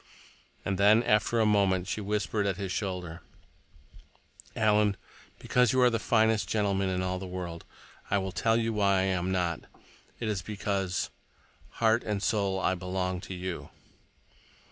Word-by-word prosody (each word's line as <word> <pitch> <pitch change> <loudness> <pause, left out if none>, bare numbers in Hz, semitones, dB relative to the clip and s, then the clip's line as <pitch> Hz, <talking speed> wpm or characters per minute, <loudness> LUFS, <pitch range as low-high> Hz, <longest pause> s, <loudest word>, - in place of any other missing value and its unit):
And 95 -1 -1
then, 105 +3 +6
after 110 +1 +2
a 110 - +4
moment, 95 -3 +2
she 105 - -3
whispered 105 0 -1
at 95 -2 -1
his 100 -2 -4
shoulder: 90 -4 -4 1.3
"Alan, 105 -2 +3 0.4
because 125 -2 +2
you 130 - +3
are 125 -1 +5
the 115 - 0
finest 110 -1 +2
gentleman 100 -3 +1
in 90 0 -1
all 95 0 -2
the 95 - -6
world, 90 -2 -6 0.4
I 100 - +2
will 95 -1 -2
tell 115 +5 +1
you 115 -1 0
why 100 -2 +3
I - - +1
am 95 -1 0
not. 85 -4 0 0.6
It 115 - -3
is 105 -4 -1
because—heart 100 +3 -2
and 105 -2 -2
soul—I 95 -3 +1
belong 90 0 -3
to 95 - -7
you." 90 -1 -5
100 Hz, 150 wpm, -29 LUFS, 95-105 Hz, 1.3 s, then